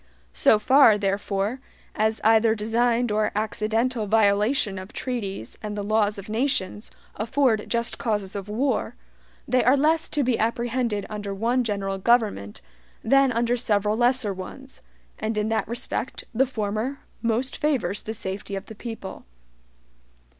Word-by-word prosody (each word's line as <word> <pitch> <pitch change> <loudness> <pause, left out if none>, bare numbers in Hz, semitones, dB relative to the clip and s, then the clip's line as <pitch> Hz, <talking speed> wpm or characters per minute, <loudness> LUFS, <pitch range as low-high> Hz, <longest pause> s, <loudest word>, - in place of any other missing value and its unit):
So 65 - +5
far, 255 0 +6
therefore, 200 +3 -1 0.3
as 220 +1 0
either 225 0 +4
designed 230 +2 +1
or 210 0 +1
accidental 220 +2 -1
violations 205 0 +2
of 190 +2 -10
treaties 200 - -5
and 210 -1 -5
the 205 - -2
laws 210 0 +1
of 200 - -8
nations 220 -3 -1 0.3
afford 230 -1 +1
JUST 235 0 -1
causes 205 -4 -2
of 200 0 -5
war, 250 +4 -1 0.5
they 255 +1 +3
are 255 +3 +5
less 315 +3 +2
to 295 - 0
be 250 -2 +1
apprehended 235 -2 -1
under 205 -2 -5
one 240 +5 +1
general 195 -3 -2
government 205 - +1 0.4
than 275 +2 +4
under 235 +1 +1
several 210 -3 +1
lesser 240 -3 +2
ones, 265 +8 -10 0.4
and 215 0 -2
in 210 +1 0
that 225 0 0
respect 240 +1 -4
the 260 +4 +2
former 220 +3 -3 0.2
most 235 +3 0
favors 240 -11 0
the 220 - -5
SAFETY 195 0 -5
of 195 +1 -5
the - - -10
people. 220 -3 -8
220 Hz, 145 wpm, -24 LUFS, 205-245 Hz, 0.5 s, far